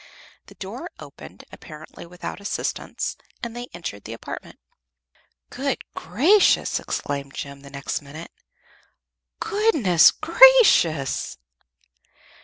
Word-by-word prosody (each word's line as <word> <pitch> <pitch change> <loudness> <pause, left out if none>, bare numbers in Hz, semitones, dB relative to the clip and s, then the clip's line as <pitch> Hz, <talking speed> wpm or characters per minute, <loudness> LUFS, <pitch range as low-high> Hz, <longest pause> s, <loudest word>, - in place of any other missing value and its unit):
The - - -15
door - - -7
opened, - - -13
apparently 155 +2 -12
without 180 +3 -8
assistance, 200 - -4 0.3
and 235 -1 -5
they 245 0 -6
entered 105 - -7
the 115 - -6
apartment. 115 - -9 0.9
"Good 270 +1 -3
gracious!" 300 - +3
exclaimed 140 -1 -5
Jem, 140 0 -7
the 140 - -13
next 140 +2 -4
minute. 150 +4 -11 1.1
"Good_ness_ 320 - +3
gracious!" 165 - +5
170 Hz, 95 wpm, -23 LUFS, -, 1.1 s, gracious